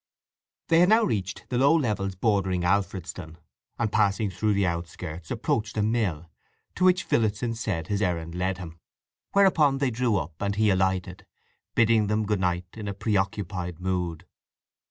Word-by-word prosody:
They 165 - +5
had 180 +2 +5
now 225 +2 +5
reached 95 - -2
the 125 - 0
low 140 +4 +5
levels 105 - -1
bordering 95 -3 +1
Alfredston, 90 -3 -2 0.4
and 115 -3 -1
passing 100 0 +1
through 105 +3 0
the 100 -1 +2
outskirts 85 -1 -5
approached 110 -1 -2
a 105 - +2
mill, 105 -8 -1 0.5
to 180 - -2
which 185 0 +4
Phillotson 115 +1 0
said 100 -8 -3
his 100 +3 -2
errand 85 -4 -1
led 90 +1 -1
him; 85 -3 -9 0.5
whereupon 165 -8 +4
they 135 -2 0
drew 120 -1 +1
up, 85 -1 -4
and 100 0 -1
he 105 -1 +3
alighted, 95 -1 -1 0.5
bidding 115 -2 +4
them 105 +1 0
good 105 -1 0
night 90 -1 0
in 110 -2 -7
a 100 - -4
preoccupied 95 -4 -2
mood. 90 -2 -2
100 Hz, 160 wpm, -26 LUFS, 90-110 Hz, 0.5 s, They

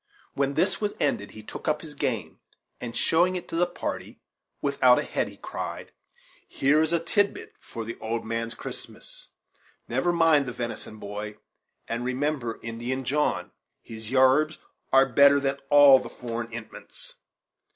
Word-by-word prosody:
When 140 0 0
this - - +1
was 210 -1 -1
ended, 105 -8 0
he 110 - -11
took - - -9
up 155 -1 +1
his 155 -2 -10
game, 125 -6 -3 0.4
and, 120 -1 -6
showing 175 +3 +3
it 180 - -5
to - - -5
the 175 +1 +3
party 175 - -5 0.4
without - - +4
a - - +1
head, - - -1
he - - -14
cried: - - -6 0.6
"Here 145 +3 +3
is 160 0 +1
a 170 - +3
tidbit 200 +5 0
for 115 - -7
an 115 +1 -6
old 115 +1 -3
man's 115 0 -3
Christmas - - -9 0.6
never 135 +9 +1
mind 165 -5 +4
the 125 - -4
venison, 115 -2 -6
boy, 105 +1 -6 0.5
and 115 +1 -3
remember 130 -2 -2
Indian 120 +3 -3
John; 150 +4 0 0.3
his 110 -1 -9
yarbs 135 +4 +4 0.3
are 135 0 +6
better 140 +2 +6
than 140 0 -1
all 145 -2 +8
the - - -8
foreign 115 -1 -5
'intments. 115 -1 -10
130 Hz, 160 wpm, -26 LUFS, 115-150 Hz, 0.6 s, all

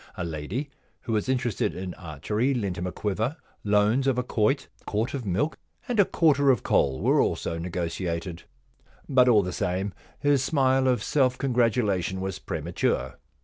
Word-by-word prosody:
A - - -2
lady 85 - -4 0.3
who 115 - -3
was 110 +3 0
interested 125 -5 0
in 90 -1 -5
archery 105 - -2
lent 100 -7 -2
him 90 - -2
a - - -3
quiver. 110 - -2 0.3
Loans 105 +6 +2
of 130 -2 +2
a 125 - +1
quoit, 120 +3 +1
a - - -27
quart 110 +4 -1
of 130 -6 -4
milk, 105 - 0 0.3
and 240 -3 -1
a 200 - +7
quarter 145 -6 +3
of 125 -6 +3
coal 65 -1 +2
were - - +4
also 85 - -1
negotiated. 85 0 -3 0.7
But 130 -2 +4
all 105 -4 +5
the 90 0 -4
same, 95 +3 -2 0.2
his 145 -2 +2
smile 130 -2 +2
of 125 -1 +2
self 130 -3 +2
congratu 125 -3 +2
lation 95 -2 -1
was 95 -1 -4
premature. - - -2
110 Hz, 175 wpm, -26 LUFS, 90-130 Hz, 0.7 s, a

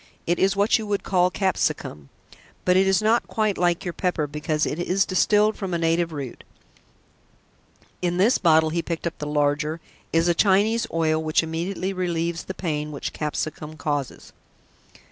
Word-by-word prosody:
It 175 +1 0
is 195 +1 +3
what 205 +3 +3
you 220 - -5
would 205 -1 -1
call 180 -1 +2
capsicum, 160 - -2 0.6
but 180 - +4
it 190 +1 +4
is 195 +1 +2
not 225 +2 +2
quite 215 -3 0
like 175 -1 +1
your 175 - -3
pepper 175 -5 -1
because 150 +1 -1
it 155 - -3
is 185 +3 +1
distilled 210 +3 +3
from 190 -3 -3
a - - +1
native 165 0 +1
root. 140 -5 -7 1.6
In 175 -1 0
this 210 +7 +3
bottle," 160 -2 +4
he 170 +1 0
picked 165 0 -5
up 170 - -4
the 150 - -4
larger, 150 +2 0 0.3
"is 165 +1 +2
a 175 - +4
Chinese 210 +5 +3
oil 160 -1 +1
which 155 +1 +2
immediately 180 +4 -3
relieves 170 -2 -2
the 190 - -6
pain 150 -4 -3
which 145 - -5
capsicum 155 0 -4
causes." 145 -4 -4
170 Hz, 170 wpm, -24 LUFS, 155-190 Hz, 1.6 s, but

